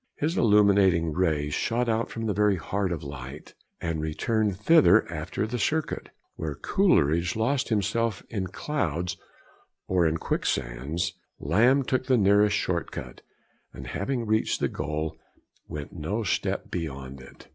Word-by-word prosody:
His 160 +4 -1
illuminating 100 - +4
rays 75 -4 0
shot 120 +1 0
out 115 0 0
from 115 0 -5
the 105 - 0
very 105 0 +3
heart 95 +2 -2
of 80 -2 -3
light, 70 +1 -8 0.3
and 85 -2 -2
returned 100 +6 0
thither 115 - +5
after 80 +6 -3
the 120 +3 -3
circuit. 155 +4 -1 0.3
Where 75 -3 -4
Coleridge 85 - +2
lost 130 +5 0
himself 110 0 0
in 95 -4 -3
clouds 90 - -2 0.7
or 90 -3 +3
in 80 0 0
quicksands, 65 +7 -2 0.3
Lamb 120 - +3
took 130 0 -1
the 130 -2 +4
nearest 105 0 +4
short 85 -2 -1
cut, - - -8 0.5
and, 65 +1 -9
having 115 - -2
reached 110 0 +1
the - - +1
goal, 75 +1 -4 0.5
went 75 -1 -7
no 95 +8 -3
step 100 - -1
beyond 70 -6 -5
it. 65 - -15
95 Hz, 145 wpm, -27 LUFS, 80-110 Hz, 0.7 s, thither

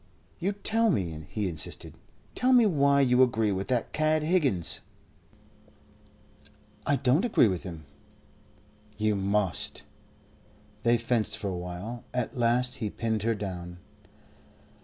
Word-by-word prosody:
"Yes, 195 +3 -1
tell 225 +1 +3
me," 85 - -2
he 105 -3 -2
insisted. 80 -5 -2 0.4
"Tell 255 +1 +2
me 245 -2 +6
why 140 -6 +3
you 125 -1 +4
agree 115 -4 +3
with 95 0 -3
that 125 -3 -1
cad 155 0 +2
Higgins?" 145 - +1 2.1
"I 145 - +3
don't 135 +5 +2
agree 230 - +4
with 95 -4 -2
him." 80 -4 -8 1.1
"You 110 0 +1
must." 100 -1 0 1.0
They 120 +1 +3
fenced 115 -2 -1
for 100 - -3
a 95 - -3
while. 90 +7 -6
At 125 -2 -2
last 125 +1 +1
he 110 - -3
pinned 110 0 -2
her 115 +2 +1
down. 90 -4 -6
115 Hz, 130 wpm, -28 LUFS, 95-140 Hz, 2.1 s, me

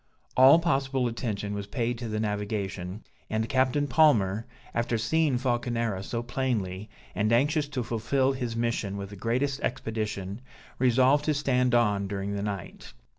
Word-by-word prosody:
All 130 +4 +8
possible 135 -6 0
attention 105 -3 -3
was 100 -1 -4
paid 120 +1 -2
to 120 - -4
the 110 -1 -2
navigation, 105 -2 -3 0.3
and 110 +1 -1
Captain 130 +3 +2
Palmer, 115 -8 +3 0.3
after 115 0 0
seeing 145 +4 +1
Falconera 120 -5 -1
so 115 +4 -4
plainly, 110 -6 -2 0.2
and 105 +1 0
anxious 145 +5 +2
to 135 -4 -3
fulfil 125 +4 +1
his 125 -3 -3
mission 115 -4 -1
with 100 0 -6
the - - -8
greatest 130 +7 -1
expedition, 105 -3 -3 0.4
resolved 130 +3 +4
to 155 - +1
stand 125 -3 +2
on 105 -4 +2
during 100 0 -3
the 100 - -2
night. 100 -10 -6
115 Hz, 150 wpm, -27 LUFS, 105-130 Hz, 0.4 s, All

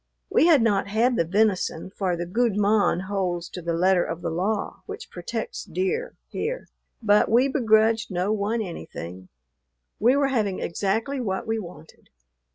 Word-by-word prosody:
We 330 - +5
had 300 -8 +6
not 205 -4 +2
had 230 +5 +2
the 170 - +2
venison, 190 -2 0
for 185 -3 -1
the 175 - -3
"gude 220 +3 +1
mon" 205 -3 +3
holds 185 -3 -2
to 180 - -7
the 170 0 -2
letter 180 +1 +3
of 165 +1 -5
the - - -1
law 195 +5 -2
which 430 +3 -8
protects 485 - -5
deer 445 +7 -2
here, - - -4 0.3
but 210 -1 +4
we 240 +5 +4
begrudged 225 -4 +3
no 185 +2 0
one 215 +2 -1
anything; 95 - -8 0.7
we 240 +5 +4
were 280 -1 +2
having 215 -7 0
exactly 220 +10 -1
what 190 -5 -2
we 225 0 -1
wanted. 170 -5 -12
210 Hz, 165 wpm, -25 LUFS, 180-235 Hz, 0.7 s, had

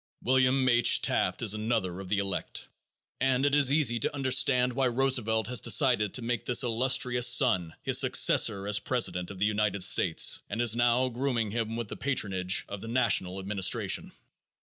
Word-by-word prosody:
William 130 +1 +1
H. 120 -1 +3
Taft 90 +4 -1
is 105 -3 +1
another 110 -5 -3
of 95 -1 -10
the 105 - -1
elect, 100 -1 -5 0.5
and 130 0 0
it 145 - 0
is 145 -2 +3
easy 140 -6 +1
to - - -2
understand 125 -2 +1
why 130 0 0
Roosevelt 120 -3 0
has 125 +3 -2
decided 120 -8 +1
to 125 - -5
make 115 -1 -3
this 125 +2 +2
illustrious 125 +1 +1
son 115 -9 +2
his - - +2
successor 100 0 +3
as 105 0 0
president 105 -8 -2
of 100 - -10
the 100 - -1
United 105 -2 -2
States 90 -2 +2
and 110 - -5
is 120 -2 +2
now 120 +2 +1
grooming 120 -3 -3
him 115 0 -4
with 115 -1 -5
the - - -8
patronage 95 -9 -1
of 100 -1 -9
the - - -9
national 115 -6 0
administration. 95 0 0
115 Hz, 175 wpm, -27 LUFS, 100-130 Hz, 0.5 s, H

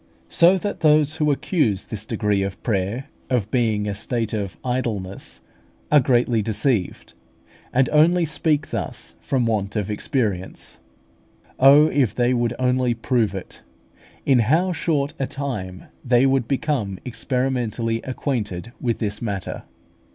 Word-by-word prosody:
So 175 +3 +5
that 205 +2 -4
those 155 0 +3
who 150 -2 +2
accuse 135 - 0
this 110 0 -5
degree 105 -3 0
of 95 -1 -4
prayer 105 +4 -1 0.2
of 115 -5 0
being 110 -4 +1
a 100 - -1
state 115 +2 -2
of 100 -3 -3
idleness, 115 -7 -3 0.5
are 150 - +7
greatly 120 -3 +2
deceived; 110 -1 -1 0.6
and 130 +1 +3
only 165 +3 +4
speak 155 -1 0
thus 105 -8 -4
from 130 -3 0
want 105 -3 -1
of 105 -1 -1
experience. 105 - -3 0.8
Oh, 140 +3 +8
if 135 -9 +1
they 125 0 +2
would 120 -1 0
only 125 -1 +1
prove 115 -4 0
it! 95 - -8 0.6
in 130 -3 +4
how 160 - +2
short 150 -4 -1
a 135 - -1
time 120 -11 -5 0.2
they 125 0 +4
would 135 -3 +2
become 130 -9 -1
experimentally 120 -2 -1
acquainted 120 -6 -3
with 120 -2 0
this 105 -2 -3
matter! 100 -5 -4
120 Hz, 135 wpm, -22 LUFS, 105-140 Hz, 0.8 s, Oh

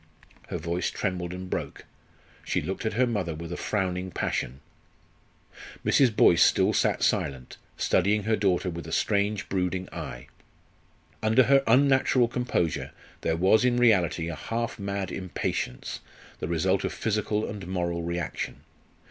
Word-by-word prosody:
Her - - -3
voice 85 +1 -2
trembled 90 -3 -3
and 90 +1 -6
broke, - - -5 0.6
she - - 0
looked 95 +4 -3
at 110 - -2
her 130 +2 +4
mother 100 -9 -2
with 85 +2 -6
a - - -3
frowning 95 -1 -2
passion. 65 -6 -2 1.3
Mrs. 125 -6 +4
Boyce 85 - +5
still - - +4
sat - - +1
silent, 65 -3 -1 0.2
studying 100 +3 +2
her 110 +2 +2
daughter 95 -3 +1
with 85 -1 -7
a - - -7
strange, 100 +2 0
brooding 95 -1 -1
eye. - - -6 1.0
Under 110 +4 +4
her 135 +3 +5
unnatural 130 0 +4
composure 120 -9 -1 0.3
there 80 0 0
was 95 +7 +4
in 125 -1 +3
reality 95 -8 +3
a 85 - -3
half 115 +5 -3
mad 100 -1 -3
impatience, 90 -8 -3 0.4
the - - -3
result 90 +3 +1
of - - -1
physical 105 0 -1
and 100 -4 -7
moral 85 -2 -2
reaction. 85 -1 -4
95 Hz, 145 wpm, -27 LUFS, 85-110 Hz, 1.3 s, Boyce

